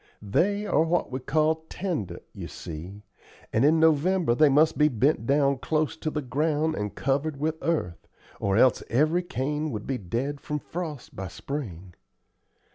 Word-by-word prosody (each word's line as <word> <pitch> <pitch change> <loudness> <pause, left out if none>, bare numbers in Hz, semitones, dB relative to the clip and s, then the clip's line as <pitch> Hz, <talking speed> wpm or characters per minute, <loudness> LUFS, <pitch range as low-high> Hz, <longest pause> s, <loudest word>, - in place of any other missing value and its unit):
They 200 - +1
are 155 - +2
what 165 -2 +1
we 130 - -2
call 155 +4 +1
tender, 115 - -3
you - - -7
see, 90 +6 -8 0.5
and 110 - +3
in 155 +3 +5
November 160 -1 +3
they 150 +4 +5
must 150 +3 +4
be 150 - +4
bent 130 -1 +1
down 140 -1 +3
close 155 +2 0
to 155 - -2
the 150 -1 -3
ground 150 +5 0
and 105 -7 -4
covered 140 +2 -1
with 160 +2 -1
earth, 120 - -2 0.3
or 100 0 +1
else 125 -1 +5
every 155 +8 +3
cane 150 -1 -2
would 105 -6 -5
be 135 -2 -2
dead 125 +10 -3
from 150 - -3
frost 155 -3 -6
by 95 0 -5
spring. 95 - -6
145 Hz, 165 wpm, -26 LUFS, 120-160 Hz, 0.5 s, in